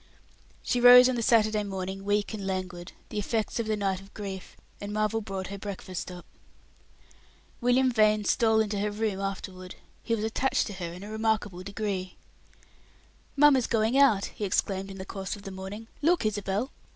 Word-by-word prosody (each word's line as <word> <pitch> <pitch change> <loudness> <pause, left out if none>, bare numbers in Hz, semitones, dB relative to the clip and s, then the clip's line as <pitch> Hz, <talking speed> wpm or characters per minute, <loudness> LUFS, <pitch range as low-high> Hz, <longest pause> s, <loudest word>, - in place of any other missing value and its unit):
She 245 - 0
rose 250 +1 +10
on 255 - +1
the 240 - -1
Saturday 215 -2 +3
morning 195 -1 -5
weak 205 +1 0
and 200 -3 -5
languid, 185 -2 -4 0.2
the 210 - -3
effects 220 +2 -2
of 230 - -2
the 215 -1 0
night 195 -2 -1
of 195 +1 -18
grief, 195 -3 -7 0.2
and 205 0 -5
Marvel 215 +1 0
brought 190 -2 -5
her 200 0 -6
breakfast 190 -3 -6
up. 180 -1 -10 1.3
William 250 +1 +3
Vane 215 -2 +3
stole 220 -1 +3
into 210 -2 -1
her 210 +1 0
room 210 -2 -2
afterward; 190 -2 -5 0.3
he 230 - 0
was 215 - -4
attached 255 +4 +1
to 210 - -6
her 175 -3 -5
in 180 +3 -9
a 210 - -8
remarkable 220 -4 -1
degree. 195 -1 -4 1.2
"Mamma's 280 -4 +5
going 225 +2 +1
out," 265 -8 +5
he - - -7
exclaimed, 195 0 0
in 195 - -8
the 190 - -6
course 195 +1 -5
of 200 - -13
the 195 - -7
morning. 190 +4 -7 0.2
"Look, 335 -3 +2
Isabel." 205 +4 -1
205 Hz, 180 wpm, -28 LUFS, 190-220 Hz, 1.3 s, rose